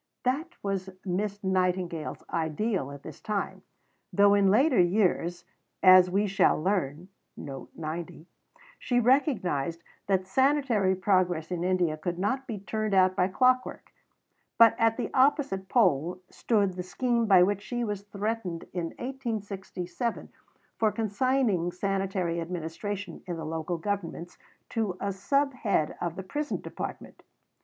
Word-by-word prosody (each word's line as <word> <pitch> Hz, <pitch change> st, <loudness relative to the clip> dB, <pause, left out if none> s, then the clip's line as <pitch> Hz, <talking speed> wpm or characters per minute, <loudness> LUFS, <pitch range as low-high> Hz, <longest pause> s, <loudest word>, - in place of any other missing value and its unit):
That 310 Hz, +8 st, -1 dB
was 195 Hz, -1 st, -2 dB, 0.2 s
Miss 200 Hz, +3 st, -2 dB
Nightingale's 180 Hz, -3 st, -1 dB
ideal 165 Hz, -, -1 dB
at 140 Hz, 0 st, -10 dB
this -, -, -10 dB
time, 210 Hz, -2 st, -3 dB, 0.5 s
though 200 Hz, 0 st, +5 dB
in 200 Hz, -1 st, +4 dB
later 255 Hz, +5 st, +4 dB
years, 175 Hz, -2 st, +1 dB, 0.4 s
as 185 Hz, -1 st, +8 dB
we 200 Hz, +3 st, +1 dB
shall 195 Hz, -5 st, +3 dB
learn, 175 Hz, -2 st, -1 dB, 1.7 s
she 245 Hz, -1 st, +1 dB
recognized 205 Hz, -, +1 dB, 0.2 s
that 190 Hz, -2 st, +1 dB
sanitary 255 Hz, -4 st, +2 dB
progress 180 Hz, -4 st, +1 dB
in 175 Hz, -1 st, -2 dB
India 180 Hz, -4 st, +1 dB
could 175 Hz, +2 st, -3 dB
not 260 Hz, +8 st, -1 dB
be 225 Hz, -, -4 dB
turned 215 Hz, +1 st, -2 dB
out 185 Hz, 0 st, +4 dB
by 180 Hz, -1 st, +2 dB
clockwork; 255 Hz, +6 st, +1 dB, 0.7 s
but 230 Hz, -1 st, +7 dB
at 225 Hz, 0 st, +3 dB
the -, -, -3 dB
opposite 265 Hz, -, +2 dB
pole 180 Hz, -, +2 dB
stood 205 Hz, -5 st, +1 dB
the 180 Hz, -, -5 dB
scheme 235 Hz, +5 st, 0 dB
by 185 Hz, -3 st, +7 dB
which 200 Hz, +1 st, 0 dB
she 240 Hz, +3 st, -3 dB
was 205 Hz, -3 st, -3 dB
threatened 200 Hz, -3 st, -3 dB
in 175 Hz, -2 st, -2 dB
1867 220 Hz, -4 st, -4 dB, 0.5 s
for 220 Hz, -1 st, +3 dB
consigning 220 Hz, -4 st, +1 dB
sanitary 190 Hz, -2 st, -1 dB
administration 175 Hz, +3 st, -5 dB
in 175 Hz, -2 st, -3 dB
the 160 Hz, -, -5 dB
Local 160 Hz, +2 st, -3 dB
Governments 175 Hz, -2 st, -4 dB, 0.3 s
to 210 Hz, -5 st, -2 dB
a 200 Hz, -1 st, -2 dB
sub 275 Hz, +9 st, +1 dB
head 200 Hz, -11 st, 0 dB
of 170 Hz, -1 st, -2 dB
the 190 Hz, -, -6 dB
prison 290 Hz, +10 st, -3 dB
department. -, -, -7 dB
195 Hz, 130 wpm, -28 LUFS, 180-225 Hz, 1.7 s, as